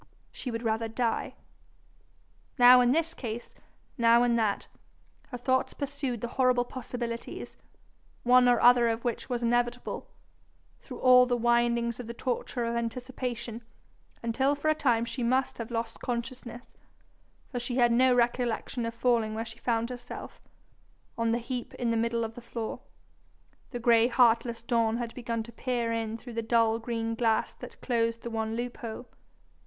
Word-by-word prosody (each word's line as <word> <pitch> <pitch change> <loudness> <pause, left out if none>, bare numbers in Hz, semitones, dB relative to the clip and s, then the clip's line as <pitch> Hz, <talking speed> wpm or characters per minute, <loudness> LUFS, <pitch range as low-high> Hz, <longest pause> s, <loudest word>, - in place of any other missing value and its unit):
she 255 - -6
would 230 0 -4
rather 225 0 0
die. 225 +1 -2 1.2
Now 250 0 +8
in 245 0 +4
this 330 +3 +1
case, 235 -1 -6 0.5
now 235 +1 +5
in 240 -1 +2
that, 220 -3 0 0.6
her 250 - -6
thoughts 260 +1 0
pursued 275 -5 -3
the 240 - -2
horrible 250 -1 +4
possibilities, 240 -2 -6 0.7
one 250 0 +6
or 245 - +4
other 245 -1 +6
of 225 +1 -3
which 240 +2 -2
was 245 -1 -2
inevitable, 240 +1 -1 0.7
through - - -10
all 250 -1 +7
the 245 -1 +1
windings 235 0 +1
of 245 - -6
the 235 - -6
torture 245 0 -2
of 230 0 -2
anticipation, 240 -1 -4 0.6
until 265 +5 +1
for 290 +2 -1
a - - +5
time 240 -7 +1
she 235 +2 -5
must 255 +2 +1
have 230 - -5
lost 230 -1 -3
consciousness, 240 0 -5 0.9
for 245 - -2
she 245 +1 -4
had 240 -2 +4
no 255 +2 +4
recollection 240 0 0
of 230 - -6
falling 230 -2 +1
where 225 +1 -3
she 225 +1 -11
found 230 0 -1
herself 245 -1 -8 0.7
on 230 0 0
the 235 - +2
heap 245 +1 -5
in 235 -2 -1
the - - +1
middle 230 +1 0
of 225 0 -4
the 245 - -10
floor. 230 -1 -5 0.9
The 245 - -5
gray 235 -1 +4
heartless 235 -1 +3
dawn 230 -2 +1
had 235 -1 -4
begun 230 -2 -3
to 235 - -12
peer 240 -2 -2
in 225 -1 -2
through 240 +1 -10
the 230 - -1
dull 225 0 +2
green 230 -1 -3
glass 225 -1 +1
that - - -11
closed 230 -2 0
the 235 - -5
one 220 0 -2
loophole. 240 0 -5
235 Hz, 165 wpm, -29 LUFS, 230-245 Hz, 1.2 s, Now